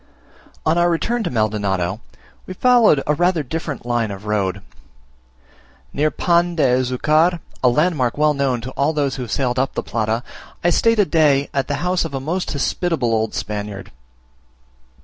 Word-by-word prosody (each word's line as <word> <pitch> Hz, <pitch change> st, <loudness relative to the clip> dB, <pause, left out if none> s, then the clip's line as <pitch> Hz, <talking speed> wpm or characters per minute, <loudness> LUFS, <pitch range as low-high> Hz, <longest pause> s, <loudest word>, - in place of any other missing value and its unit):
On 160 Hz, +2 st, +2 dB
our 175 Hz, 0 st, +3 dB
return 230 Hz, +8 st, -1 dB
to -, -, -1 dB
Maldonado, 105 Hz, -3 st, -1 dB, 0.5 s
we 185 Hz, -, -7 dB
followed 235 Hz, -, +4 dB
rather 170 Hz, +3 st, +2 dB
a -, -, -6 dB
different 150 Hz, -1 st, -5 dB
line 120 Hz, -2 st, 0 dB
of 100 Hz, +1 st, -8 dB
road. 100 Hz, -2 st, -1 dB, 1.3 s
Near 150 Hz, +2 st, +1 dB
Pan 175 Hz, +1 st, +1 dB
de 160 Hz, -, +1 dB
Azucar, 135 Hz, +7 st, +2 dB, 0.2 s
a 125 Hz, -, +6 dB
landmark 150 Hz, -3 st, +1 dB
well 150 Hz, 0 st, +3 dB
known 135 Hz, -4 st, 0 dB
to 130 Hz, +3 st, -7 dB
all 140 Hz, +4 st, 0 dB
those 140 Hz, -3 st, -1 dB
who -, -, -5 dB
have 120 Hz, -3 st, -6 dB
sailed 125 Hz, -2 st, 0 dB
up 135 Hz, 0 st, -1 dB
the -, -, -2 dB
Plata, 115 Hz, +1 st, -1 dB, 0.4 s
I 175 Hz, -, +3 dB
stayed 230 Hz, +5 st, +3 dB
a 205 Hz, -, +4 dB
day 145 Hz, -5 st, +2 dB
at 135 Hz, -1 st, -1 dB
the 145 Hz, -, -1 dB
house 180 Hz, 0 st, +1 dB
of 160 Hz, -4 st, -5 dB
a -, -, -2 dB
most 170 Hz, +7 st, -3 dB
hospitable 140 Hz, -3 st, -1 dB
old 110 Hz, -1 st, -1 dB
Spaniard. 105 Hz, -2 st, -5 dB
140 Hz, 170 wpm, -20 LUFS, 115-165 Hz, 1.3 s, a